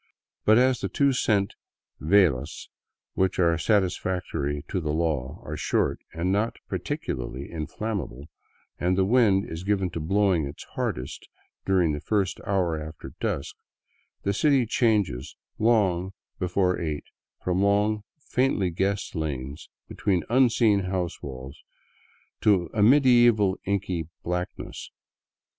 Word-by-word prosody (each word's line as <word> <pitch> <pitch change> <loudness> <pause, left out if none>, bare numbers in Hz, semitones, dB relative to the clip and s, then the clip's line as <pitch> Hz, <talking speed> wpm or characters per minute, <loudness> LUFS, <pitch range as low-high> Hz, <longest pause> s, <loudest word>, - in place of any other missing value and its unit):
But 110 +1 +6
as 130 0 +4
the - - -3
two 140 -2 +2
cent 100 -5 +1 0.5
velas 80 -5 +2 0.4
which 95 0 +1
are 85 -2 +3
satisfactory 90 -6 0
to 95 - -2
the 75 -2 -2
law 75 -5 -1
are - - -4
short - - 0
and 85 +3 -1
not 105 +4 0
particularly 65 +2 -4
inflammable, 85 - -4 0.5
and 90 +1 +1
the 95 - +3
wind 105 -3 +4
is 80 +2 -6
given 95 -2 0
to 85 - -4
blowing 90 -2 +2
its 70 - -9
hardest 65 +1 -4 0.4
during 90 -4 +3
the 75 - -2
first 100 +2 -1
hour 90 -5 0
after 80 +1 -9
dusk, 70 - -2 0.7
the 100 - +1
city 135 +2 +3
changes 105 - 0 0.2
long 95 -5 +2 0.3
before 90 0 +1
eight 75 -3 -3 0.4
from 90 +1 +1
long, 105 +2 +2 0.2
faintly 125 -8 +1
guessed 95 +4 -1
lanes 70 -1 -4 0.2
between 95 -4 0
unseen 120 -4 +4
house 90 -2 -3
walls 65 0 -8 0.8
to 95 -5 +3
a 105 - +1
medieval 120 -5 +5
inky 95 -5 -1 0.2
blackness. 90 +1 -4
95 Hz, 125 wpm, -26 LUFS, 80-105 Hz, 0.8 s, But